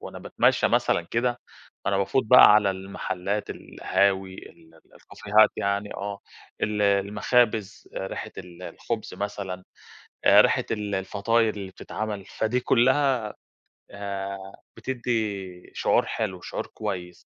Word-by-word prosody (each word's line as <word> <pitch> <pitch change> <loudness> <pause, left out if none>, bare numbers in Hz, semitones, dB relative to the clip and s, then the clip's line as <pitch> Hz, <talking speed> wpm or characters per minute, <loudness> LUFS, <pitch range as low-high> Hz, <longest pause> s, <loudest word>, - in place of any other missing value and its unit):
وأنا - - -8
باتمشى - - +2
مثلًا - - +2
كده، 120 +7 -1 0.4
فأنا 100 - +1
بافوت 110 +7 +1
بقى 125 -2 +9
على 105 -2 +4
المحلات، 95 +1 -4
القهاوي 95 -1 0
ال 80 -3 -14
الكافيهات 105 +6 +1
يعني 100 +1 -2
آه، 100 0 -5 0.4
ال 105 0 0
المخابز، 105 +2 +1
ريحة 95 - -5
ال 90 0 -11
الخبز 110 +4 -5
مثلًا، 100 -3 -5 0.6
ريحة - - +6
ال 105 -2 -2
الفطاير 105 +4 +1
اللي 100 -2 -7
بتتعمل، 105 +1 -5
فدي 110 +4 -1
كلها، 130 -2 +2 0.6
آآ، 100 -1 -5 0.4
بتدّي 105 -8 -3
شعور - - +2
حلو، 95 -5 -3
شعور - - -5
كويس 90 -5 -6
100 Hz, 115 wpm, -25 LUFS, 95-110 Hz, 0.6 s, بقى